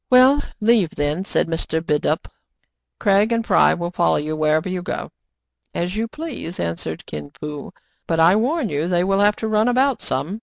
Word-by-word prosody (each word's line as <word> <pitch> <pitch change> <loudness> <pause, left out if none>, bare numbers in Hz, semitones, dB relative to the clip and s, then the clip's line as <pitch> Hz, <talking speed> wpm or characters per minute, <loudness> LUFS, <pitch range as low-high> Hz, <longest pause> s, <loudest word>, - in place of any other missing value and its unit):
'* - - -60
Well, 260 +3 +6 0.2
leave 215 -6 +2
then/* 145 +6 -1
said - - 0
Mr. 165 -1 -2
Bidulph. 150 -2 0 0.4
" - - -52
Craig 200 +3 +3
and 230 -1 0
Fry - - +4
will 175 0 -4
follow 175 -1 +2
you 155 +1 -2
wherever 155 +2 +1
you 185 -1 -3
go." 180 - -5 0.6
"As 175 +3 -2
you 225 +2 -1
please," 290 - -7
answered 85 0 -4
Kin 75 -1 -7
Fo; 150 -1 -6 0.4
"but 165 -1 0
I 170 +4 +6
warn 255 +5 +1
you 150 +2 -1
they 175 -1 +1
will 195 +1 +1
have 205 +1 +4
to 220 - -4
run 215 +1 +2
about 260 +1 +2
some." 160 +11 -3
180 Hz, 195 wpm, -21 LUFS, 155-225 Hz, 0.6 s, Well